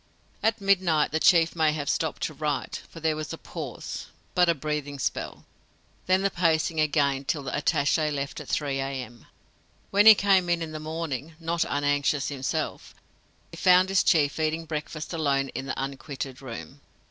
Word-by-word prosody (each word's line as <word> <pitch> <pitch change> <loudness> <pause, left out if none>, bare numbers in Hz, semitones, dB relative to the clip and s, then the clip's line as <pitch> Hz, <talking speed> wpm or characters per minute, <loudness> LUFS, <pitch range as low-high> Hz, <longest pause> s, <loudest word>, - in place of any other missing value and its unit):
At 225 +1 +1
midnight 185 -6 +2
the 160 - 0
chief 165 0 +4
may 160 -2 +3
have 145 -2 -4
stopped 160 0 -1
to 155 - -2
write, 150 -2 -3
for 165 - -11
there 160 -1 +1
was 155 0 -5
a - - -6
pause - - -7 0.3
but 180 -1 +4
a 170 - +3
breathing 150 -1 -3
spell. 135 - -3 0.6
Then 185 +1 +3
the 195 - +2
pacing 160 -2 +1
again 145 -3 +2
till 145 +1 -2
the 135 - -4
attaché 150 0 +1
left 140 -1 -4
at - - -9
3 140 -2 -1
A.M. 130 -4 -5 0.6
When 205 +2 +5
he 220 - +12
came 195 -3 +3
in 165 -2 0
the 155 - -5
morning, 155 -1 -5
not 165 0 0
unanxious 145 0 0
himself, 135 -2 -3 0.6
he - - -10
found 185 0 +5
his 195 -1 +4
chief 150 -3 +2
eating 160 +1 -1
breakfast 155 +1 -5
alone 140 -4 0
in 135 - -6
the 130 - -3
unquitted 135 -1 -5
room. 115 - -9
155 Hz, 170 wpm, -26 LUFS, 140-165 Hz, 0.6 s, he